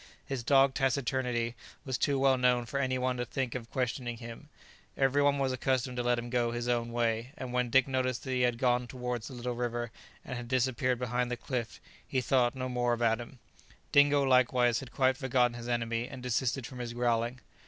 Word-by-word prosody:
His 135 -3 -3
dogged 135 +2 +4
taciturnity 125 -3 0 0.3
was 130 -2 -2
too 140 +3 +1
well 135 0 +4
known 125 -1 +2
for 140 +4 -3
any 130 -1 0
one 125 0 0
to 120 - -1
think 130 0 -3
of 115 -2 -6
questioning 125 -2 -2
him; 115 +5 -10 0.5
every 135 +1 +3
one 145 0 +3
was 135 -1 +1
accustomed 130 0 0
to - - +1
let 120 0 +2
him 120 0 -5
go 120 -2 +1
his 120 +1 -3
own 120 -1 0
way, 115 +2 -1
and 125 -1 -6
when 125 -1 +1
Dick 135 +2 +4
noticed 130 -2 -1
that 130 - -4
he 125 -1 +1
had 120 -1 +2
gone 125 0 +1
towards 125 -2 -4
the 130 - -8
little 125 0 -3
river, 120 -1 -3 0.3
and 125 - -5
had 120 -1 -6
disappeared 130 0 +1
behind 125 0 -1
the 125 - -2
cliff, 120 -1 -4 0.3
he 130 - 0
thought 125 0 +2
no 130 -1 -3
more 120 -1 0
about 115 -1 +1
him. 120 +2 -11 0.5
Dingo 145 0 +5
likewise 125 -2 +3
had 130 -2 -9
quite 130 0 +2
forgotten 125 -2 +2
his 120 0 -7
enemy, 115 0 -1
and 130 -2 -9
desisted 125 +1 0
from 130 -1 -9
his 120 -1 -4
growling. 120 0 0
125 Hz, 210 wpm, -30 LUFS, 120-130 Hz, 0.5 s, Dingo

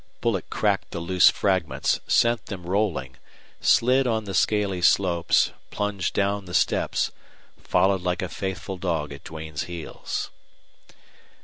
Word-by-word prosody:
Bullet - - -1
cracked - - 0
the - - -5
loose 90 +2 +5
fragments, 85 -9 0
sent 120 -1 +2
them 90 -4 -7
rolling, 85 -9 -1 0.4
slid 130 +2 +4
on 110 -2 0
the 100 -2 -6
scaly 100 -1 +1
slopes, 85 -2 +3 0.2
plunged 105 -3 -2
down 100 0 0
the 90 - -6
steps, - - +1 0.5
followed 95 -1 +2
like 90 -1 -1
a - - -1
faithful 95 0 -4
dog 80 -5 -2
at 70 - -12
Duane's 80 -1 -6
heels. 85 -2 -5
95 Hz, 130 wpm, -25 LUFS, 85-100 Hz, 0.5 s, loose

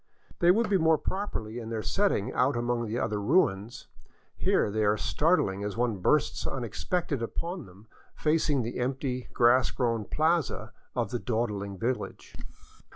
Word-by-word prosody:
They 175 - +4
would 220 +5 +4
be 200 -2 +2
more 160 -1 +4
properly 140 - -4
in 115 -1 -7
their 110 -1 -3
setting 195 - +1
out 135 +3 +2
among 120 -1 -1
the 110 +3 -2
other 105 -4 -1
ruins; 115 - +1 0.5
here - - +1
they 110 +1 0
are 105 0 +3
startHng 105 - +1
as 105 +1 -4
one 120 -3 +1
bursts 150 +11 +1
unexpectedly 135 - -2
upon 170 - -5
them 95 +4 -16 0.3
facing 150 -4 +1
the 120 +2 -4
empty 130 0 -2
grass 120 +2 +4
grown 115 -4 -1
plaza 155 - 0 0.2
of 120 -1 -1
the 120 - -1
dawdling 105 -5 -2
village. 120 +5 -3
120 Hz, 155 wpm, -28 LUFS, 110-155 Hz, 0.5 s, They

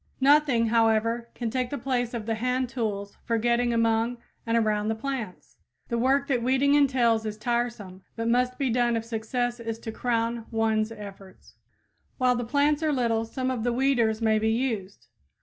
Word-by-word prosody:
Nothing, 270 -4 +4
however, 230 +1 +2
can 230 -2 -3
take 255 0 -1
the 285 - -3
place 245 -2 -2
of 225 -3 -4
the 225 - -1
hand 250 +2 -1
tools 205 -5 -4
for 230 -1 0
getting 240 +1 +1
among 230 +1 +1 0.3
and 230 0 +2
around 215 -2 +1
the 220 - 0
plants. 230 -5 -6 0.3
The 235 - -1
work 270 +3 +2
that 250 -4 +1
weeding 265 +3 +2
entails 250 -6 +3
is 215 -1 -5
tiresome, 235 -5 -3
but 230 0 -3
must 250 +1 +1
be 270 -4 0
done 240 0 +2
if 225 - -4
success 240 +2 -2
is 225 -1 -4
to 225 0 -7
crown 230 0 -1
ones 225 -1 0
efforts. 200 -3 -11 0.6
While 255 -1 +3
the 245 - -2
plants 285 +5 +1
are 310 -1 +1
little 230 -4 0
some 255 +3 -3
of 240 -4 -3
the 245 - +1
weeders 235 -4 +1
may 220 -1 +3
be 220 +1 +1
used. 220 -5 -2
235 Hz, 185 wpm, -26 LUFS, 225-250 Hz, 0.6 s, Nothing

